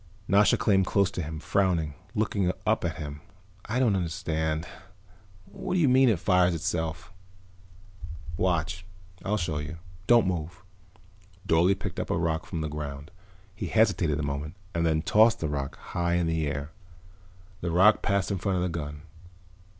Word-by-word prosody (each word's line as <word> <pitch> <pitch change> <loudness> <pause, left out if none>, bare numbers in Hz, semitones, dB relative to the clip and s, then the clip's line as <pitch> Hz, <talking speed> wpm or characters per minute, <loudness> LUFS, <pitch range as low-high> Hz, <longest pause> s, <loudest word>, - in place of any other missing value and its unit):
Nasha 100 0 +4
came 95 -2 +3
close 100 0 +2
to 90 - -3
him, 80 0 -5
frowning, 85 -3 +1 0.2
looking 100 -4 +1
up - - +2
at - - -1
him. 75 -1 -7 0.4
"I 115 - -2
don't 120 -6 +3
understand. 80 -3 -2 0.8
What - - -5
do - - +3
you 155 - +4
mean, 130 0 +5
it 110 - +2
fires 90 0 +3
itself?" 80 +2 -3 1.2
"Watch, 90 0 0 0.4
I'll 105 +2 0
show 80 -5 -2
you. 75 +2 -6 0.3
Don't 120 -2 +6
move." 90 0 -3 0.8
Dorle 85 +4 +4
picked - - -5
up - - -3
a - - +1
rock 80 -1 -1
from 85 -3 -4
the 80 - -2
ground. 75 0 -6 0.4
He - - -4
hesitated 100 -9 +2
a - - -1
moment 70 +3 -4 0.2
and 85 0 +1
then 80 -1 +1
tossed 110 +3 +4
the 80 - -1
rock 70 -2 -4
high 85 0 -2
in 85 -1 +1
the 80 -2 0
air. 70 +2 -4 0.9
The 85 - -3
rock 95 +6 +5
passed 100 0 0
in 100 - -1
front 95 +1 0
of 90 - 0
the 90 - 0
gun. 75 -3 -5
85 Hz, 165 wpm, -27 LUFS, 80-100 Hz, 1.2 s, Don't